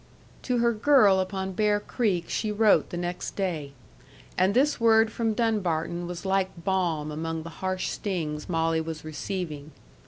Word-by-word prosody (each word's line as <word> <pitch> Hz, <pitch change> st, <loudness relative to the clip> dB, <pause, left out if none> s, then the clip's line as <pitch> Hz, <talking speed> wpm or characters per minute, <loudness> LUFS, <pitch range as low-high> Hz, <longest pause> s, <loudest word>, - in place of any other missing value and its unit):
To 250 Hz, -1 st, -1 dB
her 235 Hz, 0 st, +3 dB
girl 215 Hz, -5 st, +5 dB
upon 190 Hz, 0 st, -2 dB
Bear 210 Hz, +1 st, +2 dB
Creek 205 Hz, -6 st, -1 dB
she 215 Hz, -, -1 dB
wrote 210 Hz, 0 st, +3 dB
the 175 Hz, -, -5 dB
next 175 Hz, +1 st, -4 dB
day. 160 Hz, -8 st, -3 dB, 0.6 s
And 190 Hz, +2 st, +2 dB
this 280 Hz, +3 st, +3 dB
word 225 Hz, -1 st, +4 dB
from 225 Hz, -2 st, -1 dB
Dunbarton 175 Hz, -7 st, -1 dB
was 175 Hz, +1 st, -7 dB
like 190 Hz, 0 st, +1 dB
balm 175 Hz, -6 st, 0 dB
among 160 Hz, +1 st, -4 dB
the 170 Hz, -, -7 dB
harsh 185 Hz, 0 st, -1 dB
stings 160 Hz, -7 st, -3 dB
Molly 165 Hz, -1 st, +1 dB
was 160 Hz, -1 st, -6 dB
receiving. 155 Hz, -2 st, -5 dB
185 Hz, 155 wpm, -27 LUFS, 165-210 Hz, 0.6 s, girl